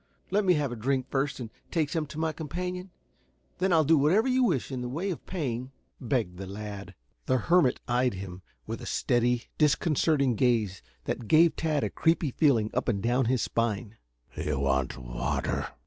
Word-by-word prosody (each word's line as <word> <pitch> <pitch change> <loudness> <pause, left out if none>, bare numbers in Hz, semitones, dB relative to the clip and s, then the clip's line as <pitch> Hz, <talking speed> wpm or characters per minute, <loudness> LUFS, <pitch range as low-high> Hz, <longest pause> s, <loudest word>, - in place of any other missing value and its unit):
Let 205 +2 +3
me 180 -1 +5
have 145 -4 0
a - - -4
drink 130 +3 0
first 140 +1 -1
and 115 -3 -6 0.2
take 155 -5 0
some 155 -2 -1
to 150 - -10
my 160 0 0
companion; 180 +4 -4 0.7
then 190 +1 +2
I 165 - +5
will 160 - +5
do 160 +2 +4
whatever 180 - +3
you 260 0 +3
wish 165 - 0
in 130 -2 -3
the 125 - -4
way 170 +9 -2
of 170 - -6
paying," 130 -8 -3 0.3
begged 115 -8 -1
the 95 - -6
lad. 100 -1 -7 0.3
The 130 - +3
hermit 160 +1 +3
eyed 125 -1 +1
him 95 -1 -7 0.2
with - - -5
a - - -7
steady, 120 0 +1 0.2
disconcerting 150 -2 +3
gaze 110 -5 +1 0.2
that 115 - -4
gave 165 +4 +5
Tad 155 -3 0
a - - -1
creepy 165 -3 +1
feeling 120 -8 +2
up 125 - -1
and 110 -5 +1
down 120 +2 +2
his 125 0 +1
spine. 115 -1 -1 0.4
"You 75 -2 -2
want 65 -1 0
water?" - - -2
130 Hz, 190 wpm, -28 LUFS, 110-160 Hz, 0.7 s, me